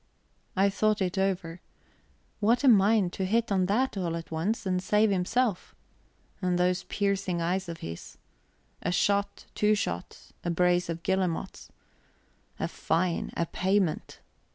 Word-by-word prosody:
I 195 +1 +3
thought 215 +1 +1
it 185 -2 -1
over. 180 -3 -1 0.8
What 230 +5 +2
a - - +4
mind, 205 -4 +5
to 190 - -3
hit 230 +3 +1
on 185 -2 +2
that 235 +5 +1
all 175 -4 -2
at 165 0 -7
once, 190 +8 -1
and 185 -1 0
save 210 +3 +3
himself! 200 +3 0 0.7
And 180 -1 +1
those 180 +1 +1
piercing 200 -3 -1
eyes 180 +2 -1
of 165 - -7
his. 85 0 -8 0.6
A 180 - -1
shot, 200 +3 0
two 210 0 +3
shots, 85 - -5
a - - -2
brace 180 +1 +2
of 165 0 -4
guillemots 185 -3 -2 0.9
a - - 0
fine, 170 +1 -1
a 170 - +1
payment. 185 -1 -1
185 Hz, 145 wpm, -28 LUFS, 175-205 Hz, 0.9 s, mind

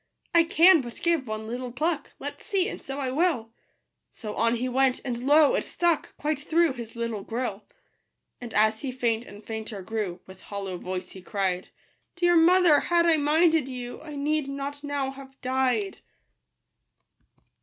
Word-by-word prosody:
I 335 -1 +6
can 335 0 +6
but 240 -2 -9
give 335 -6 +1
one 215 0 -4
little 245 +2 -5
pluck: 305 +5 -1
Let's - - -8
see, 390 -2 +1
and - - -6
so 270 0 -6
I 265 -3 -2
will." 275 -7 0 0.6
So 215 -2 -7
on 230 +2 +2
he 245 +2 -2
went; 260 0 +2
and 245 0 -3
lo! 295 0 +6
it - - +1
stuck 340 -3 -1
Quite 300 -1 -1
through 320 0 +2
his 235 -2 -8
little 230 -3 -3
gill. 225 -1 -4 0.8
And 240 -2 -7
as 215 +1 +3
he 270 - -3
faint 235 -2 -1
and 205 +1 -13
fainter 220 -3 -6
grew, 200 -3 -3
With 190 0 -14
hollow 195 -3 -5
voice 185 0 -5
he 190 - -10
cried, 185 -1 -2 0.2
" - - -46
Dear 350 0 +3
mother, 340 -2 +6
had 340 -1 +2
I 330 -2 +5
minded 315 0 +3
you, 250 -2 -6
I 300 -2 -9
need 295 0 0
not 280 +1 -5
now 285 -2 -2
have 270 0 -13
died." 265 +10 0
265 Hz, 175 wpm, -26 LUFS, 225-310 Hz, 0.8 s, I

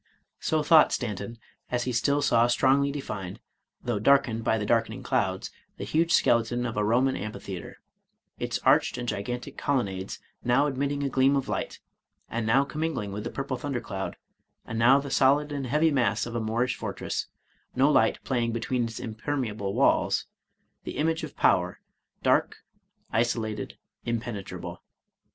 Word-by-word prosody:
So 155 -1 0
thought 155 0 +6
Stanton, 110 -1 -3 0.3
as 125 -1 0
he 125 - -2
still 140 +5 +1
saw 120 -3 +4
strongly 135 +3 +3
defined, 105 -10 -5 0.4
though 120 -4 -1
darkened 115 -1 +3
by 110 - +2
the 105 - -2
darkening 115 +3 0
clouds, 100 -8 -1 0.3
the - - -5
huge 160 +11 +1
skeleton 120 -4 +3
of 120 - -3
a 105 - +1
Roman 125 +5 +2
amphitheater, 95 -2 -6 0.6
its - - -1
arched - - +4
and 120 0 -4
gigantic 120 +4 -4
colonnades 100 -9 -1 0.3
now 125 +4 +3
admitting 140 0 -1
a 140 - 0
gleam 135 +1 +3
of 135 - -1
light, - - -3 0.5
and 115 -1 -2
now 135 +5 +4
com 150 +2 -6
mingling 130 -11 -2
with 105 +1 -5
the 120 - -3
purple 135 0 -3
thunder 140 -3 -3
cloud; 95 -4 -5 0.5
and 115 - -4
now 125 +4 +6
the 140 -1 -6
solid 145 +3 +3
and 140 -3 -3
heavy 150 +5 +3
mass 120 -7 +1
of 120 - -6
a 120 - -1
Moorish 120 +3 0
fortress, - - -4 0.5
no 135 +3 +4
light - - +3
playing 120 -3 0
between 120 +1 -1
its 115 -1 -6
impermeable 110 -4 -3
walls, - - +3 0.3
— - - -48
the - - -6
image 160 +1 0
of - - -7
power, - - +2 0.4
dark, - - +2 0.5
isolated, 115 -2 -1 0.3
impenetrable. 115 -4 -4
120 Hz, 160 wpm, -27 LUFS, 110-140 Hz, 0.6 s, thought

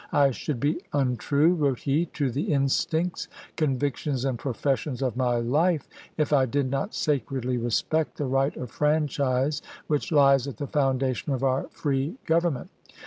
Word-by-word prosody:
"I 140 -1 +4
should 135 +1 -4
be 150 +6 0
untrue," 140 +4 +2
wrote 145 -7 0
he, 150 +5 +1
"to 140 -4 0
the 150 - -2
instincts, 160 +5 0 0.3
convictions, 140 -2 -1
and 130 -4 -1
professions 135 +1 -1
of 125 -3 -1
my 125 -1 +1
life 150 +8 +1 0.3
if 150 -1 +1
I 135 -2 +4
did 135 +1 0
not 195 +10 -2
sacredly 130 -3 -1
respect 135 +7 0
the 145 - -1
right 135 +2 +1
of 125 -4 -6
franchise 145 -2 +1 0.2
which 150 +1 -1
lies 140 -3 +5
at 140 - -6
the 145 - -3
foundation 135 -2 0
of 130 0 -2
our 130 0 +1
free 140 - -1
govern 165 -1 +2
ment. 125 - -9
140 Hz, 160 wpm, -26 LUFS, 130-150 Hz, 0.3 s, lies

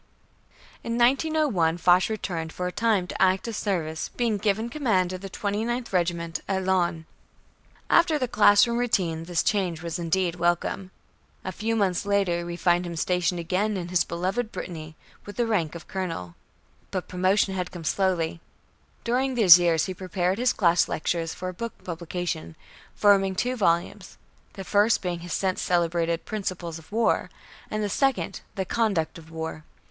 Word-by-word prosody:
In 230 0 -2
1901, 250 - +2
Foch 180 +2 +4
returned 170 -7 -3
for 180 - -4
a 180 - -2
time 210 -3 +1
to 180 - -6
active 190 +4 +2
service, 160 -7 -2
being 230 -3 -1
given 215 +2 0
command 220 -10 0
of 185 - -6
the 195 - -7
29th 220 +5 -2
Regiment 170 -2 -1
at 190 -1 -1
Laon. 175 -3 +1 0.8
After 335 -2 +4
the 255 -3 -1
classroom 220 +2 +5
routine, 175 -9 0
the 175 0 -9
change 175 -2 0
was 170 +1 -4
indeed 175 +1 0
welcome. 175 +2 0 0.6
A 185 - -2
few 220 +5 -2
months 195 -4 +1
later 195 -4 0
we 170 - -4
find 175 0 +2
him 170 - -5
stationed 180 +1 0
again 195 +5 0
in 175 -1 -5
his 180 -2 +3
beloved 190 +7 -2
Brittany, 155 -3 -7 0.3
with 205 - -8
the 240 - +1
rank 180 -9 0
of 170 - -9
Colonel. 165 - -4 0.6
But 185 -3 -4
promotion 190 +2 +1
had 180 -1 -3
come 175 -2 -8
slowly. 170 0 0 0.6
During 255 +2 0
these 185 -7 +9
years 170 -2 +2
he 185 - -4
prepared 185 +1 -1
his 250 0 +3
class 175 -4 +3
lectures 165 +1 -2
for 185 0 -5
book 230 +5 -5
publication, 170 - -4 0.4
forming 195 -2 +4
two 250 +6 0
volumes, 185 -1 0 0.4
the 195 - -7
first 205 +3 +2
being 175 -2 -2
his 175 0 -6
since 190 -1 0
celebrated 170 -1 0
"Principles 180 -6 -4
of 160 - -19
War," 225 +2 +1 0.4
and 215 0 -2
the - - 0
second 270 +5 0
"The 190 -2 -2
Conduct 195 -7 0
of 160 0 -15
War." 160 -1 -6
185 Hz, 165 wpm, -26 LUFS, 170-210 Hz, 0.8 s, these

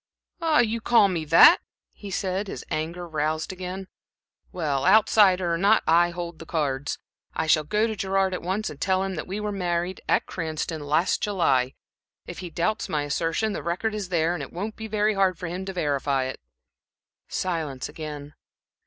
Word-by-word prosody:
"Ah, 320 -5 +4
you 230 0 -1
call 220 -3 +5
me 165 -4 -2
that!" - - +8 0.3
he 205 - -9
said, 190 +1 -2
his - - -7
anger 170 +3 -3
roused 155 +2 -2
again. 185 +1 -6 0.6
"Well, 145 -6 -1
outsider 190 -3 +5
or 165 - -1
not, 205 +4 +4
I 170 +2 +4
hold 170 -2 -6
the 165 - -9
cards. 145 -3 -1 0.4
I 160 - 0
shall 155 0 +4
go 210 +7 +1
to 220 -1 -2
Gerard 195 -1 0
at 180 - -3
once 190 +5 -2
and 145 - -12
tell 190 0 +2
him 195 0 -3
that 160 - -5
we 195 +3 -4
were 210 0 -2
married 180 -1 -2
at - - +3
Cranston, 160 -1 -4
last 155 +5 +2
July. 135 -11 +1 0.5
If - - -8
he 180 - -6
doubts 170 +6 -1
my 150 -1 0
assertion, 165 +8 -1
the - - -4
record 180 +6 -2
is 205 -3 -4
there, 170 -1 +1
and 175 - -4
it 140 - -7
won't 205 +5 -5
be 220 - -7
very 215 0 +1
hard 190 -3 +2
for 180 - -6
him 180 +3 -4
to 195 - -5
verify 140 -5 0
it." 130 0 -5 0.9
Silence 160 -8 -3
again. 150 -1 -8
175 Hz, 190 wpm, -25 LUFS, 155-195 Hz, 0.9 s, that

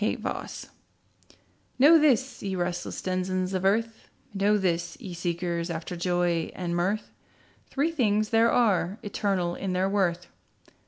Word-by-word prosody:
THREE 210 - +1
THINGS - - -6 1.1
Know 310 +5 +7
this, 270 -3 +2
ye 195 -1 -3
restless 175 -1 -3
denizens 185 0 -1
of 185 -1 -1
earth, 225 +3 0 0.2
Know 205 +1 +2
this, 175 - -1
ye 195 -8 -7
seekers 170 0 -2
after 165 +1 -4
joy 175 -1 0
and 175 -2 -3
mirth, 190 +5 -1 0.6
Three 290 +4 0
things 215 -8 +1
there 230 0 +4
are, 200 -5 +2
eternal 195 -4 -1
in 190 +1 -3
their 185 +1 +1
worth. 180 -3 0
190 Hz, 140 wpm, -27 LUFS, 175-215 Hz, 1.1 s, Know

